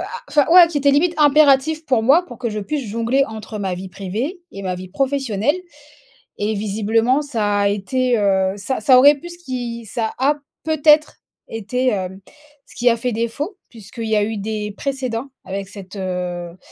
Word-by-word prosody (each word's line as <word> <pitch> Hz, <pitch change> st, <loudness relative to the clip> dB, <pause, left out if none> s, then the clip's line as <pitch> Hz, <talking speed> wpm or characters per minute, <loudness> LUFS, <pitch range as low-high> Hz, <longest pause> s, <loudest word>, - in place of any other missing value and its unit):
a -, -, -6 dB, 0.2 s
enfin 295 Hz, -2 st, +3 dB
ouais 355 Hz, -1 st, +9 dB
qui 300 Hz, -3 st, -1 dB
était 280 Hz, 0 st, +3 dB
limite 335 Hz, +5 st, +2 dB
impératif 300 Hz, +1 st, +4 dB
pour 240 Hz, -4 st, +2 dB
moi, 300 Hz, +9 st, +4 dB
pour 240 Hz, -, -10 dB
que 240 Hz, -3 st, -2 dB
je 210 Hz, -, -4 dB
puisse 275 Hz, +6 st, -3 dB
jongler 230 Hz, +5 st, +1 dB
entre 220 Hz, -1 st, -7 dB
ma 190 Hz, -2 st, -2 dB
vie 190 Hz, +1 st, -7 dB
privée 220 Hz, -, -4 dB
et 195 Hz, -, -8 dB
ma 185 Hz, -1 st, -2 dB
vie 185 Hz, +1 st, -8 dB
professionnelle. 270 Hz, -, 0 dB, 0.8 s
Et 210 Hz, +1 st, -1 dB
visiblement, 220 Hz, +6 st, +1 dB
ça 215 Hz, -8 st, -1 dB
a 200 Hz, -, +3 dB
été, 240 Hz, +5 st, 0 dB
heu, 190 Hz, -2 st, +2 dB
ça 235 Hz, +6 st, -2 dB
ça 255 Hz, +2 st, +6 dB
aurait 285 Hz, +3 st, +7 dB
pu 345 Hz, +5 st, -10 dB
ce 345 Hz, -, -10 dB
qui 245 Hz, -7 st, -5 dB
ça 220 Hz, +2 st, -3 dB
a 280 Hz, +3 st, +2 dB, 0.3 s
peut-être 310 Hz, 0 st, +3 dB, 0.3 s
été, 225 Hz, +4 st, -2 dB
hem, 190 Hz, -3 st, -3 dB, 0.5 s
ce -, -, -17 dB
qui 245 Hz, 0 st, +3 dB
a 230 Hz, -, +2 dB
fait 245 Hz, +2 st, -2 dB
défaut. 280 Hz, -, -3 dB
Puisqu'il 230 Hz, +1 st, -9 dB
y 215 Hz, -, +2 dB
a 205 Hz, -, +2 dB
eu 220 Hz, 0 st, -3 dB
des 210 Hz, 0 st, -4 dB
précédents 265 Hz, -2 st, -3 dB, 0.2 s
avec 195 Hz, 0 st, -5 dB
cette, 195 Hz, -1 st, -11 dB
heu, 180 Hz, -2 st, -4 dB
230 Hz, 190 wpm, -20 LUFS, 205-275 Hz, 0.8 s, ouais